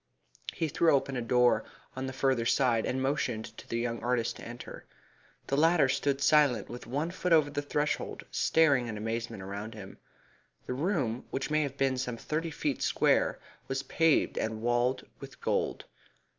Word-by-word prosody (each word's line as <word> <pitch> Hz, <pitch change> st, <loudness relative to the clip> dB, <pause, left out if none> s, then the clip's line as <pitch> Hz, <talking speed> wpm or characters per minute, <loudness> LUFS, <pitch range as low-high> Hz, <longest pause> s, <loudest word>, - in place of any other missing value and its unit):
He 160 Hz, -, -1 dB
threw 160 Hz, +1 st, +3 dB
open 135 Hz, 0 st, -1 dB
a 125 Hz, -, -1 dB
door 125 Hz, +1 st, +3 dB, 0.3 s
on 130 Hz, +1 st, -3 dB
the -, -, -3 dB
further 130 Hz, -2 st, +1 dB
side, 120 Hz, -4 st, +2 dB
and 130 Hz, +1 st, -1 dB
motioned 130 Hz, -5 st, -2 dB
to -, -, -12 dB
the 115 Hz, -, -1 dB
young 115 Hz, 0 st, -2 dB
artist 120 Hz, -1 st, 0 dB
to -, -, -11 dB
enter. 120 Hz, +1 st, -9 dB, 0.6 s
The 140 Hz, -, -1 dB
latter 160 Hz, 0 st, +4 dB
stood 135 Hz, +1 st, 0 dB
silent 145 Hz, -9 st, +4 dB
with 120 Hz, -1 st, -8 dB
one 145 Hz, +7 st, -2 dB
foot 180 Hz, -1 st, -3 dB
over 155 Hz, -3 st, +5 dB
the 145 Hz, 0 st, -2 dB
threshold, 145 Hz, +1 st, -2 dB
staring 140 Hz, -6 st, +3 dB
in 110 Hz, -2 st, -4 dB
amazement 115 Hz, -1 st, -4 dB
around 100 Hz, +4 st, -6 dB
him. 100 Hz, -3 st, -10 dB, 0.7 s
The -, -, -3 dB
room, 135 Hz, -, -1 dB
which 135 Hz, +2 st, -3 dB
may 155 Hz, 0 st, +3 dB
have 140 Hz, -2 st, -3 dB
been 135 Hz, -1 st, +1 dB
some 125 Hz, -2 st, -3 dB
thirty 160 Hz, +6 st, -2 dB
feet 150 Hz, -3 st, -2 dB
square, -, -, +2 dB, 0.3 s
was 135 Hz, 0 st, -2 dB
paved 160 Hz, +3 st, +2 dB
and 110 Hz, 0 st, -3 dB
walled 120 Hz, +2 st, +1 dB
with -, -, -11 dB
gold. -, -, -1 dB
130 Hz, 175 wpm, -30 LUFS, 120-145 Hz, 0.7 s, over